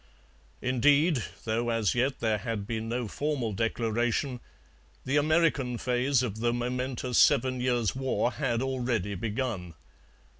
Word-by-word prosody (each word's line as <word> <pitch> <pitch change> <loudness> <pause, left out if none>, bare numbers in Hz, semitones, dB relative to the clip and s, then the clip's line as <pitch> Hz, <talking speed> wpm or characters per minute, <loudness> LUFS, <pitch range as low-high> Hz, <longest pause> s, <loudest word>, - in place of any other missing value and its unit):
Indeed, 140 +2 +3 0.2
though 115 +2 0
as 115 -4 +1
yet 130 +3 0
there 110 -2 +1
had 105 -1 -3
been 110 0 -3
no 120 0 -2
formal 135 -3 -2
declaration, 115 +4 -1 0.7
the 135 - 0
American 150 -5 +2
phase 125 +2 +1
of 110 -3 -4
the 120 +1 +1
momentous 125 +1 -1
Seven 130 +1 +4
Years' 120 -3 +1
War 130 -2 0
had 120 -1 -1
already 120 -6 -1
begun. 105 - -3
120 Hz, 125 wpm, -28 LUFS, 115-130 Hz, 0.7 s, Seven